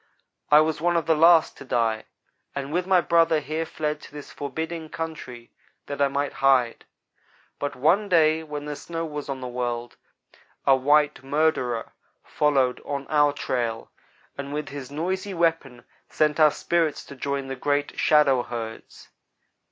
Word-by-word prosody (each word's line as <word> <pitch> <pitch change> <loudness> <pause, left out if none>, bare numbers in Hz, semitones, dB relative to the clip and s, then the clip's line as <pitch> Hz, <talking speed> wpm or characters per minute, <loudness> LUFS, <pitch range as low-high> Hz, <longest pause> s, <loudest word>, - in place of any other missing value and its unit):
I 150 +1 +7
was 155 -1 -1
one 175 0 +2
of 165 - -1
the 160 - +3
last 165 +1 +5
to - - -10
die, 115 -4 0 0.5
and 140 +1 -4
with 180 +1 0
my 185 -2 +4
brother 165 -2 +3
here 155 +3 -3
fled 150 -1 -3
to - - -13
this 145 -1 -10
forbidding 160 +3 -5
country 155 -8 -7 0.3
that 140 0 -5
I 140 - +5
might 140 +1 -2
hide; 130 -4 +3 0.7
but 145 -1 -3
one 170 +11 +2
day 160 -2 +4
when 150 -2 -6
the 150 0 -4
snow 165 +3 -5
was 150 -2 -6
on 135 -1 -4
the 125 - -4
world, 120 -1 -4 0.7
a 135 - +6
white 150 +3 +2
murderer 135 -5 0 0.3
followed 135 -4 +1
on 140 -1 -4
our 145 -1 +4
trail, 120 -5 -3 0.5
and 140 0 -5
with 150 0 -4
his 140 -2 -7
noisy 185 +6 -3
weapon 165 -7 0 0.3
sent 150 0 +1
our 155 -1 +7
spirits 165 0 -1
to 140 - -11
join 140 +1 -3
the 135 0 -5
great 145 +2 -1
shadow 145 -4 +4
herds. 115 -2 -8
145 Hz, 160 wpm, -25 LUFS, 135-160 Hz, 0.7 s, I